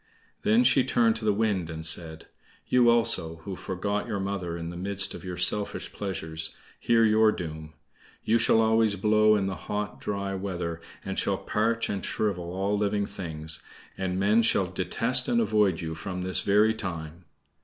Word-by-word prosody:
Then 110 +4 +4
she 130 +1 +4
turned 115 -3 +2
to 110 - -6
the 105 - +4
Wind 100 -5 0
and 80 0 -5
said: 80 -1 0 0.4
"You 125 -1 +4
also, 115 -9 +3
who 95 +1 -5
forgot 100 +3 -3
your 100 - -3
mother 95 -3 -3
in 85 0 -5
the - - -9
midst 95 +2 0
of - - -9
your 90 -1 -6
selfish 100 +4 0
pleasures, 80 -5 -3 0.2
hear 115 -1 +3
your 110 0 +4
doom. 80 -4 -7 0.5
You 115 +2 +2
shall 115 - +4
always 110 -1 +3
blow 110 +2 +4
in 100 -2 0
the 95 - -2
hot, 105 +2 -5
dry 100 -1 -3
weather, 90 -4 -4 0.2
and - - -2
shall - - 0
parch 115 +2 -1
and 100 -2 -3
shrivel 90 -5 -2
all 95 +3 -1
living 105 0 0
things. 80 -6 -4 0.3
And 95 -1 -2
men 105 +4 +4
shall 110 -4 +2
detest 95 +7 0
and 240 -1 +2
avoid 105 - +2
you 80 -1 -4
from 90 +3 -5
this 95 0 +1
very 105 +2 +3
time." 85 -5 -6
100 Hz, 175 wpm, -27 LUFS, 90-110 Hz, 0.5 s, Then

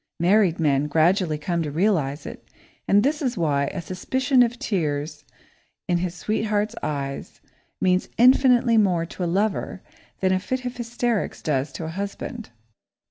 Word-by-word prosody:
Married 180 0 +3
men 145 -2 +2
gradually 160 +2 +2
come 170 +3 -2
to 155 - -2
realise 155 -4 0
it, - - -10 0.4
and 205 +1 +4
this 295 +3 0
is 255 -5 -1
why 145 -4 +1
a 180 - -5
suspicion 255 - +1
of 240 0 +2
tears 150 -7 -2 0.6
in 175 -1 +1
his 175 0 -3
sweetheart's 210 +2 -1
eyes 140 -2 -4 0.4
means 185 0 +1
infinitely 250 -1 +5
more 180 -5 +2
to 180 - -6
a 175 - 0
lover 195 0 -1 0.4
than 190 -1 +2
a 185 - +1
fit 255 +6 -4
of 245 0 -4
hysterics 240 -2 -2
does 140 -1 -1
to 165 - -5
a - - -4
husband. 200 +5 -6
185 Hz, 155 wpm, -23 LUFS, 160-225 Hz, 0.6 s, infinitely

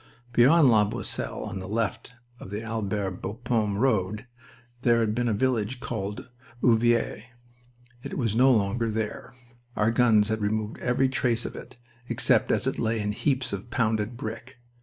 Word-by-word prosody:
Beyond 140 +6 +6
La 110 -2 +5
Boisselle, 110 +4 -3
on 95 - -5
the 95 - -7
left 115 +2 -2 0.3
of - - -9
the 105 +3 -5
Albert 105 -4 -3
Bapaume 110 -1 -1
road, 105 -3 0 0.6
there 120 -2 +3
had 110 -2 +1
been 120 +1 0
a - - +2
village 120 +1 0
called 105 -6 -5 0.4
Ovillers. 115 -1 +2 0.8
It - - -6
was 115 -5 0
no 130 +3 +5
longer 115 +1 +1
there. 110 +4 -4 0.4
Our 105 +2 +2
guns 115 -3 +4
has 110 0 -1
removed 105 +1 -2
every 125 +2 +1
trace 120 -3 0
of - - -6
it, 125 0 -11 0.3
except - - +2
as - - +1
it - - -1
lay 115 0 0
in 105 0 -1
heaps 130 +2 -1
of 100 +4 -5
pounded 110 -1 0
brick. 120 +3 -7
115 Hz, 160 wpm, -26 LUFS, 105-120 Hz, 0.8 s, Beyond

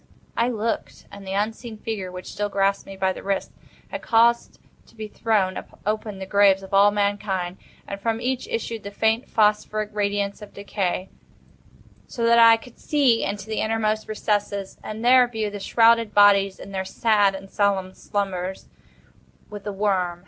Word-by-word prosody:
I 235 - +2
looked; 230 -1 -3
and 200 -1 -11
the 190 - -3
unseen 220 +3 -3
figure, 210 -4 -5
which 180 0 -8
still 205 0 -2
grasped 195 0 0
me 195 - -9
by 190 0 +1
the - - -9
wrist, 195 0 -2 0.4
had - - -5
caused 235 +1 +2 0.3
to - - -22
be 220 -1 -6
thrown 210 -4 0 0.2
open 215 -1 -2
the 190 - -6
graves 195 -1 +4
of 190 - -11
all 200 +1 +6
mankind; 200 -3 -1 0.3
and 200 0 -6
from 225 +1 -1
each 255 - -2
issued 460 - -4
the 200 - -7
faint 220 +4 0
phosphoric 210 0 +1
radiance 200 0 -1
of 210 - -12
decay; 195 -2 -3 1.0
so 235 - -5
that 235 0 +5
I 230 0 +8
could 235 +1 -16
see 270 -6 +2
into 200 -1 -3
the 220 0 -3
innermost 220 -1 -1
recesses, 205 -2 -2
and 220 +2 -6
there 250 0 +6
view 220 -3 -3
the 205 - -6
shrouded 230 +1 +3
bodies 200 -1 +5
in 200 - -10
their 190 -1 -2
sad 205 0 +2
and 195 0 -9
solemn 195 -2 0
slumbers 190 -2 -4 0.8
with 205 -1 -8
the 205 - -3
worm. 190 -4 -1
205 Hz, 170 wpm, -23 LUFS, 195-225 Hz, 1.0 s, I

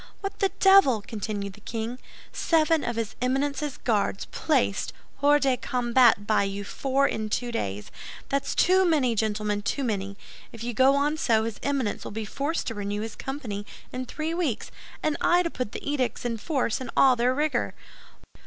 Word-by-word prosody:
"What 395 0 -5
the 390 - +3
devil!" 385 - +6
continued 205 -2 -4
the 210 - -16
king. 230 +3 -4 0.3
"Seven 325 -1 +2
of 235 - -2
his 225 -2 -3
Eminence's 280 +2 -1
Guards 205 -4 0
placed 250 - 0 0.3
hors 290 +1 +5
de 270 -2 +3
combat 240 -4 +3
by 215 - +3
you 200 0 -2
four 270 +6 +1
in 215 -1 -3
two 240 +3 -1
days! 100 - -4 0.4
That's 275 0 -1
too 375 +2 +4
many, 295 -9 +2
gentlemen, 210 -1 -1
too 275 +6 -2
many! 200 -4 -2 0.3
If 230 -1 -9
you 240 0 -3
go 260 +4 +5
on 295 +2 +1
so, 225 -7 +2
his 225 -1 -4
Eminence 275 -7 -1
will - - -6
be 220 +1 -4
forced 285 +9 -2
to 230 - -3
renew 205 0 -3
his 220 0 -5
company 250 -7 -5 0.3
in 255 0 -4
three 315 +4 -3
weeks, 330 -10 -2 0.3
and 305 -2 +1
I 355 +1 +4
to 335 - -2
put 250 -5 -4
the - - -7
edicts 255 -5 -1
in 230 -1 -1
force 260 -1 -1
in 255 - -5
all 265 -2 +6
their 245 +2 +2
rigor. 300 +2 0
250 Hz, 180 wpm, -26 LUFS, 215-285 Hz, 0.4 s, devil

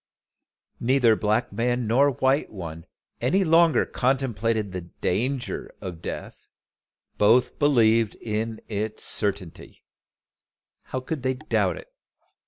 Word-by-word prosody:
Neither 125 -2 +4
black 110 +3 0
man 120 +1 0
nor 130 +6 +4
white 135 +2 +1
one 85 -5 -8 0.3
any 150 +12 +2
longer 165 -1 +4
contemplated 115 -5 0
the 90 -1 -4
danger 120 +9 -3
of 85 -3 -7
death: - - -7 0.7
both 115 +5 +3
believed 115 -6 +3
in 110 0 -4
its 110 0 -3
certainty. 100 -5 -3 1.0
How 130 - -4
could 145 +2 -4
they 130 0 0
doubt 155 +5 0
it? - - -13
115 Hz, 110 wpm, -25 LUFS, 105-130 Hz, 1.0 s, Neither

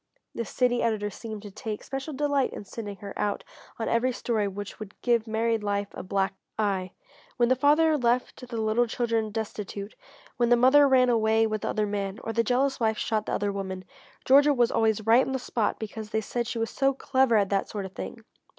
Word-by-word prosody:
The 230 - -3
city 245 +3 +1
editor 215 -3 0
seemed 220 0 -8
to 205 - -9
take 215 +1 -6
special 270 +3 -5
delight 285 -1 0
in - - -7
sending 205 0 -7
her 200 - -6
out 205 -1 -1 0.3
on 225 - -3
every 235 +2 +2
story 225 -4 -1
which 205 +1 -7
would 215 -2 -10
"give 235 -2 +2
married 225 0 0
life 205 -1 -1
a - - -6
black 195 +1 -1 0.2
eye." 195 -4 -1 0.4
When 240 -1 +3
the 255 - +4
father 305 +4 +4
left 250 +1 0
the 235 - -4
little 220 +2 +2
children 230 -2 -1
destitute, 210 -1 -5 0.4
when 240 -1 +2
the 240 - +7
mother 265 +4 +6
ran 255 -2 +4
away 225 -1 +3
with 215 -1 -2
the - - -2
other 215 - 0
man, 200 -1 -3
or 225 - -3
the 230 +1 +2
jealous 265 +4 +1
wife 220 -2 +1
shot 215 -1 -1
the - - -2
other 205 0 0
woman, 190 -1 -5 0.4
Georgia 285 +2 +6
was 240 -2 +3
always 220 -1 +1
right 230 +3 +6
on 265 - -3
the - - +1
spot 235 -3 -1
because 220 0 -6
they 220 - 0
said 235 +3 -3
she 235 - -4
was 225 -1 -2
so 270 0 +1
clever 260 -3 +2
at 200 -2 +3
that 195 -1 0
sort 205 -2 -4
of 190 - -8
thing. 225 +2 -7
225 Hz, 215 wpm, -27 LUFS, 210-245 Hz, 0.4 s, the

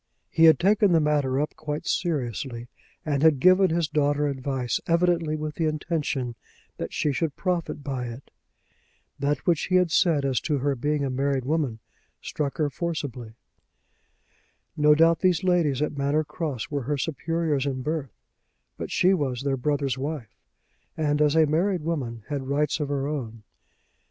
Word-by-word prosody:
He 165 - +5
had 160 - +7
taken 200 0 +3
the 165 - +5
matter 145 -3 +1
up 150 - -2
quite 155 +2 -5
seriously, 125 - -2 0.4
and 145 -3 0
had 155 -3 +5
given 185 +4 +5
his 165 -1 0
daughter 145 0 +1
advice 130 -3 -2
evidently 170 -2 +2
with 155 0 -4
the 160 0 -1
intention 150 -5 -2 0.4
that - - -5
she 150 - 0
should 145 +1 -2
profit 175 -5 -2
by 135 -3 -3
it. 120 +3 -10 0.9
That 140 0 -1
which 170 -4 +2
he 185 - 0
had 180 -2 +3
said 160 -5 +3
as 130 -3 0
to 150 -3 0
her 140 +1 0
being 145 +3 -1
a 135 - -2
married 135 0 0
woman 145 -6 0 0.4
struck 145 -2 -3
her 150 -2 0
forcibly. 140 -10 -4 1.4
No 150 -1 +5
doubt 165 +1 +4
these 180 -3 +2
ladies 165 -7 +2
at 150 - -3
Manor 140 +2 +1
Cross 150 -7 -4
were 145 -1 -1
her 145 - +1
superiors 155 0 -1
in 130 -2 -3
birth; 150 -2 -2 0.7
but - - -5
she 185 +2 +3
was 135 -7 -1
their 140 -1 0
brother's 135 -1 -1
wife, 140 -3 -5 0.6
and 150 -1 +1
as 150 0 +3
a 160 -1 +6
married 170 +3 0
woman 130 -9 -3
had 140 -3 -4
rights 150 +2 0
of 145 -2 -2
her 140 -1 -1
own. 115 -7 -5
150 Hz, 165 wpm, -25 LUFS, 135-160 Hz, 1.4 s, had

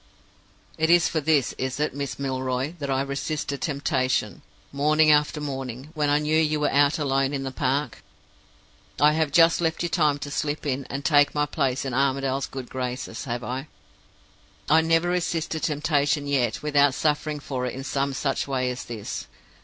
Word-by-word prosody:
"It 160 0 +2
is 175 -1 +5
for 160 - -1
this, 145 -3 +2
is 130 +1 -2
it, 150 - 0
Miss 140 0 -4
Milroy, 130 +1 -2
that 140 -2 -4
I 135 0 +1
resisted 140 +1 -3
temptation, 130 - -1 0.3
morning 155 +2 +4
after 150 +1 +2
morning, 135 -2 -5
when 150 -3 0
I 145 - +4
knew 150 +1 0
you 155 -1 +1
were 150 - +1
out 145 +1 +3
alone 135 -1 0
in 135 - -3
the 135 - -4
park? 130 +1 -1 1.0
I 150 +2 +6
have 155 -1 0
just 165 +3 +5
left 165 0 0
you 175 - -1
time 150 -4 +2
to 145 0 -7
slip 150 +1 -2
in, 135 -1 -2
and 140 0 -6
take 145 -2 +4
my 150 0 +2
place 140 -3 -1
in 130 - -3
Armadale's 135 0 0
good 130 -2 -7
graces, 125 0 -5
have 120 -1 -4
I? 130 +4 -4 1.0
I 160 +2 +5
never 165 +1 +2
resisted 165 -3 -1
temptation 145 -1 +1
yet 135 -3 0
without 145 -2 +3
suffering 150 0 0
for 130 -3 -3
it 125 - -5
in 135 - -6
some 140 0 -1
such 135 0 -1
way 130 -2 0
as 125 - -6
this! 110 -4 -6
140 Hz, 180 wpm, -25 LUFS, 135-150 Hz, 1.0 s, I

